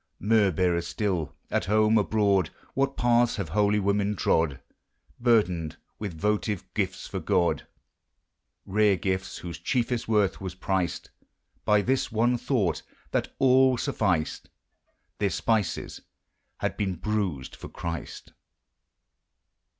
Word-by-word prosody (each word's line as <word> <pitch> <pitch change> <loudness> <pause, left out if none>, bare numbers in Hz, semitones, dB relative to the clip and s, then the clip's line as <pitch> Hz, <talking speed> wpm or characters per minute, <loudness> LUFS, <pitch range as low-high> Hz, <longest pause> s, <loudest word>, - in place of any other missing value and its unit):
Myrrh 105 -1 +3
bearers 85 -1 +1
still, 90 -9 -2
— - - -34
at - - 0
home, 110 +2 +3
abroad, 100 -3 +2 0.3
JRThat 135 0 0
paths 120 0 +3
have 100 -6 -4
holy 105 +4 +2
women 100 +1 +1
trod, 80 -7 +1 0.6
Burdened 90 -10 +2 0.2
with 95 -7 -5
votive 105 0 0
gifts - - -2
for - - -4
God, 85 -1 +1 0.5
— - - -53
Rare 105 0 +3
gifts 95 +1 -2
whose 85 -2 -7
ehiefest 120 -2 -1
worth 105 -4 +1
was 95 -2 -5
priced 95 -2 -2 0.5
By 105 -1 +4
this 130 +3 0
one 120 +3 +2
thought, 110 -11 0 0.3
that - - -1
all 130 -1 +5
sufficed: 90 -8 -1 0.7
Their 100 - +2
spices 100 +2 -1 0.6
had - - -1
been 95 -3 -1
bruised 95 -8 -2
for - - -10
Christ! 85 -1 -6
100 Hz, 125 wpm, -27 LUFS, 90-110 Hz, 0.7 s, all